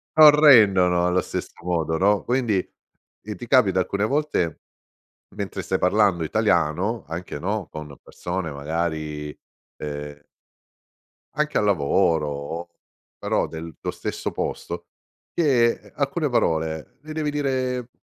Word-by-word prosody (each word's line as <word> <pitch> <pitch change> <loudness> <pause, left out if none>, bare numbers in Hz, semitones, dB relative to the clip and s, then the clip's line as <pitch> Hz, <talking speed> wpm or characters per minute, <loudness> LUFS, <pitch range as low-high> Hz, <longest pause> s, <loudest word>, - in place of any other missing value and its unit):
non 155 -1 +10
rendono 100 - +6
allo 90 +1 +2
stesso - - -5
modo, 80 -2 0
no, 100 +3 +3
quindi, 120 -5 +1 0.7
ehm, 105 0 -6
ti 120 - -9
capita 100 -9 +4
alcune 100 +3 0
volte 140 - 0 0.8
mentre - - -4
stai - - -1
parlando 90 -3 +2
italiano 90 +9 +1
anche, 85 -2 -5
no, 100 +4 -3
con 75 -3 -8
persone, 90 -2 -4
magari, 75 0 -3 0.5
ehm 75 -1 -6 1.2
anche 150 0 0
al - - +2
lavoro 80 -3 +2
o 80 +4 -5 0.5
però - - 0
del 80 0 -8
tuo - - -2
stesso - - -4
posto, 85 0 -4 0.5
che, 130 -8 +3
ehm, - - -17
alcune 145 +2 -1
parole 80 -8 -1
le 155 +1 -8
devi 155 -1 -1
dire 130 -4 -1
90 Hz, 125 wpm, -23 LUFS, 80-125 Hz, 1.2 s, non